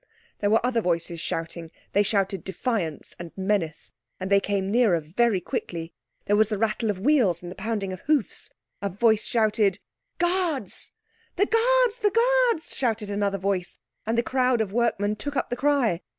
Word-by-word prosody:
There 205 - +1
were 225 +3 +3
other 240 -2 +1
voices 170 -2 -1
shouting; 165 0 -4 0.2
they 205 - +4
shouted 195 -3 0
defiance 190 - -3
and 170 -1 -7
menace, 190 -5 -1 0.3
and 190 +1 -4
they 200 - +6
came 195 -1 -1
nearer 220 -7 +4
very 195 +7 +1
quickly. 165 -1 -5 0.3
There 205 - +2
was 215 0 +4
the 210 -1 -2
rattle 220 +1 0
of 205 - -1
wheels 200 - +2
and 175 - -7
the - - -9
pounding 205 -2 -3
of 185 - -7
hoofs. 290 -4 -1 0.3
A 200 - -1
voice 220 +3 +2
shouted, 215 -4 +2 0.4
"Guards!" 345 - -1 0.4
"The 405 - +3
Guards! 485 +1 +3
The 425 -4 +2
Guards!" 480 -4 +2
shouted 225 -5 -1
another 200 -1 0
voice, 190 -2 -2 0.3
and 225 +1 0
the 235 - +3
crowd 255 -1 +1
of 205 -3 -1
workmen 215 -3 +1
took 285 +6 -5
up - - -1
the - - 0
cry. 255 -9 +1
210 Hz, 175 wpm, -25 LUFS, 190-250 Hz, 0.4 s, they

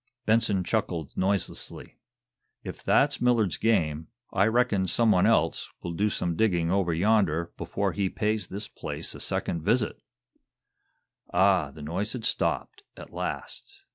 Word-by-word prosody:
Benson 110 -4 +2
chuckled 85 -7 -2
noiselessly. 95 -1 -3 0.6
"If - - -8
that's - - +3
Millard's 115 -8 +2
game 80 -8 +1 0.3
I 100 +3 +3
reckon 110 -5 +2
some 115 +4 +3
one 90 -3 +4
else - - +1
will 85 - -3
do 105 +5 +1
some 85 -4 -2
digging 85 -5 +1
over 95 -3 +1
yonder 85 -2 +2
before - - -2
he 100 -2 -1
pays 105 +1 -1
this 100 +2 -6
place - - -6
a - - -10
second 85 - -2
visit!" 110 +6 0 1.3
Ah, 95 -4 +3
the 75 +1 -11
noise 95 +8 -2
had 120 -4 -5
stopped, 400 - -1 0.2
at - - -11
last. 400 0 -6
100 Hz, 140 wpm, -27 LUFS, 85-110 Hz, 1.3 s, one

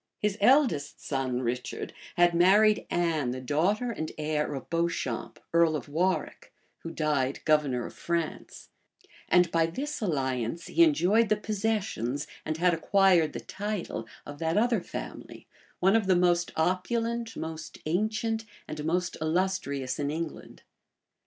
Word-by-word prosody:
His 210 -1 0
eldest 235 - +3
son, 130 -2 -1
Richard, 125 +1 -3 0.2
had 175 0 +5
married 205 +5 +4
Anne, 165 -6 0
the 130 +1 -3
daughter 180 - 0
and 155 -8 -4
heir 150 -1 -1
of 135 - -7
Beauchamp, 165 -8 -2
earl 170 -2 +4
of 150 - -5
Warwick, 175 +6 -1 0.3
who 165 - -7
died 150 -5 0
governor 145 -6 +2
of - - -8
France; 170 -2 -4 0.6
and 180 -1 +4
by 165 -1 +3
this 275 - -4
alliance 135 - -1
he 340 - +1
enjoyed 230 - +4
the 215 - +4
possessions, 205 - -2 0.2
and 155 0 -3
had 175 +1 +3
acquired 175 -2 +3
the - - -5
title, 200 - -4 0.2
of 145 0 -9
that 165 +3 0
other 230 -2 +2
family, - - -8 0.3
one 190 +3 +4
of 220 -4 +2
the 185 - +5
most 175 -1 +2
opulent, 225 +7 -1
most 160 -1 -6
ancient, 220 +6 0 0.2
and 155 -1 -5
most 180 +3 -1
illustrious 155 -6 -1
in 145 -1 -1
England. 165 +2 -6
170 Hz, 140 wpm, -28 LUFS, 150-205 Hz, 0.6 s, had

